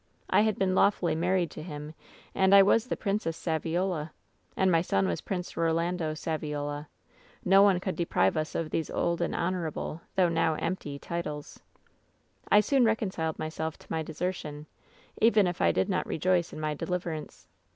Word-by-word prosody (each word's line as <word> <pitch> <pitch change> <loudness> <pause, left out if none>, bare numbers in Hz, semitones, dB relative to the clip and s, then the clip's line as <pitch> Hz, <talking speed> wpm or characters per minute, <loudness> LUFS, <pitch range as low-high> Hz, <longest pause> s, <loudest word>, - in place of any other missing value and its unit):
I - - +5
had 215 -1 +1
been 190 -1 +1
lawfully 185 -2 +3
married 175 +1 +1
to - - -8
him, 150 -2 -7 0.4
and 190 +1 +5
I 195 - +9
was 225 +4 +3
the - - -2
Princess 195 -5 -2
Saviola. 165 0 -1 0.5
And 190 -1 +3
my 165 -1 +4
son 95 - +1
was 85 - -2
Prince 180 -2 -4
Eolando 165 0 0
Saviola. 150 -2 -3 0.6
No 195 +2 +6
one 200 -3 +5
could 185 0 -4
deprive 130 - +1
us 155 0 -2
of 160 -2 -2
these 160 - -1
old 170 0 -1
and - - -1
honorable, 170 -2 -2
though 185 -2 +4
now 165 -1 +1
empty, 155 -5 -3
titles. 150 -2 -5 0.9
^^I 210 0 +7
soon 270 +3 +3
reconciled 190 -8 0
myself 160 0 -4
to - - -19
my 160 - 0
desertion, 155 -2 -4 0.6
even 220 -3 +5
if 175 -1 -2
I 85 - +5
did 95 +2 +1
not - - -1
rejoice 175 +1 +1
in - - -8
my 155 -1 -1
deliverance. 170 0 -5
170 Hz, 170 wpm, -29 LUFS, 155-185 Hz, 0.9 s, I